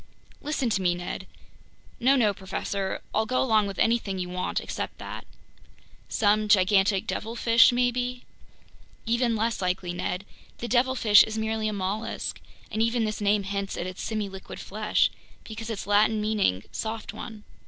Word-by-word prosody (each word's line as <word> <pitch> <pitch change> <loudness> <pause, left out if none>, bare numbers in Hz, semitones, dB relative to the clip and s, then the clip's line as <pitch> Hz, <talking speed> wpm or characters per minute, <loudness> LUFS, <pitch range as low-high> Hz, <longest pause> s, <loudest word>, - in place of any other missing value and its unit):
"Listen 295 -3 -1
to 195 - +1
me, 175 -1 +2
Ned—" 175 0 -5 0.7
"No, 265 +3 +4
no, 220 -6 +3
professor. 190 0 -3
I'll 220 +1 +1
go 255 - +1
along 220 -5 +3
with 195 - -6
anything 225 -4 +1
you 180 -1 -3
want 180 0 -2
except - - -5
that. - - -8 0.8
Some 215 0 +2
gigantic 195 0 +4
devilfish 230 +1 +4
maybe... 245 0 0 0.4
?" - - -28
"Even 235 0 +1
less 225 0 -1
likely, 180 -1 -1
Ned. 180 +2 -3 0.3
The 240 - -5
devilfish 240 -4 +5
is 220 0 0
merely 220 0 -1
a 215 - -1
mollusk, 200 +3 -3 0.3
and 220 - -1
even 230 0 +2
this 215 0 -3
name 205 0 +2
hints 200 0 -3
at 175 - -3
its 185 0 -6
semiliquid 200 -3 -4
flesh, 210 +2 +1 0.3
because 225 0 -7
it's 220 -3 -4
Latin 210 +2 +3
meaning 210 - +1
soft 220 0 -4
one. 220 -3 -8
215 Hz, 155 wpm, -26 LUFS, 195-230 Hz, 0.8 s, devilfish